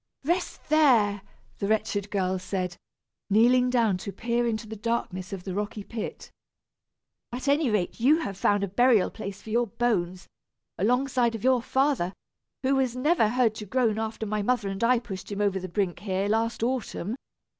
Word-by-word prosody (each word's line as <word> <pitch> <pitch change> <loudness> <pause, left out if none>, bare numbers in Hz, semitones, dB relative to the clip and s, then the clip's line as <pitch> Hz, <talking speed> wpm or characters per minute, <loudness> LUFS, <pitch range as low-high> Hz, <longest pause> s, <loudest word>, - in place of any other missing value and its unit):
"Rest 350 +5 -2
there!" 240 -10 +4 0.4
the 200 - -1
wretched 210 -1 0
girl 190 -2 0
said, 185 -1 -3 0.5
kneeling 245 +4 +4
down 230 -6 +2
to 200 +2 -6
peer 235 +3 -1
into 220 -1 -2
the 220 +1 -7
darkness 205 -4 -3
of 190 -2 -6
the 190 - -5
rocky 205 +1 -3
pit. 225 +1 -6 1.0
"At 250 +3 -5
any 285 -1 +3
rate, 210 -2 -1
you 275 +7 +5
have 200 -10 -4
found 205 +1 +2
a - - 0
burial 230 +1 +3
place 200 -2 -7
for 220 - -8
your 240 +1 +2
bones, 185 -5 -1 0.5
alongside 245 +3 +1
of 225 - -7
your 255 -1 +4
father, 265 -8 +1 0.5
who 270 +1 +2
was 255 -2 0
never 255 -3 +3
heard 240 -2 +2
to 215 -1 -8
groan 225 -1 +1
after 220 0 -3
my 210 0 -1
mother 225 -2 0
and 195 +3 -4
I 245 +2 +5
pushed 195 -5 -7
him 200 - -4
over 200 -2 +1
the 185 0 -6
brink 180 -1 -1
here, 195 0 -1
last 225 +1 0
autumn! 235 -4 -2
220 Hz, 175 wpm, -27 LUFS, 200-245 Hz, 1.0 s, you